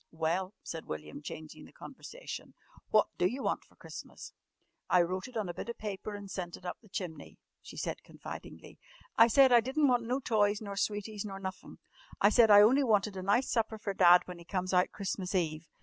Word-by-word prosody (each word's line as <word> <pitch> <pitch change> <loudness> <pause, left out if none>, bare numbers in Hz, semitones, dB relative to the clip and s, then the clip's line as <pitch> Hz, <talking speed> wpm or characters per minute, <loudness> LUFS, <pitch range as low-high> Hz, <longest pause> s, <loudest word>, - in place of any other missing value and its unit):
"Well," 175 +5 -1
said 165 -1 -6
William 75 - -7
changing 155 +1 -9
the - - -16
conversation, - - -9 0.3
"what 215 - +5
d'you 210 +10 0
want - - -1
for - - -26
Christmas?" - - -10 0.6
"I 180 -1 +5
wrote 185 +4 -3
it 250 -2 -7
on 210 -3 -1
a 175 - -4
bit - - -7
of 235 - -5
paper 210 0 -5
an' 205 -1 -9
sent 180 -3 -5
it 185 - -17
up 180 - -5
the 215 - -20
chimney," 170 -7 -6 0.2
she - - -12
said - - -3
confidingly. - - -10 0.4
"I 230 - +7
said 265 +3 +6
I 240 -1 +7
di'n't 270 +5 +1
want 245 -3 +2
no 255 +3 0
toys 210 -5 +1
nor 200 -2 -6
sweeties 205 +1 -2
nor 195 -2 -6
nuffin'. 190 -1 -7 0.4
I 200 - +6
said 230 -1 +6
I 205 0 +9
only 260 +6 +5
wanted 210 -4 +2
a 185 - -4
nice 205 +8 +1
supper 225 -2 0
for 205 -2 -4
Dad 180 -2 +7
when 180 -1 -9
he - - -11
comes 185 +1 -3
out 180 0 +4
Christmas 195 -1 -4
Eve. 160 -2 -1
200 Hz, 210 wpm, -31 LUFS, 180-225 Hz, 0.6 s, I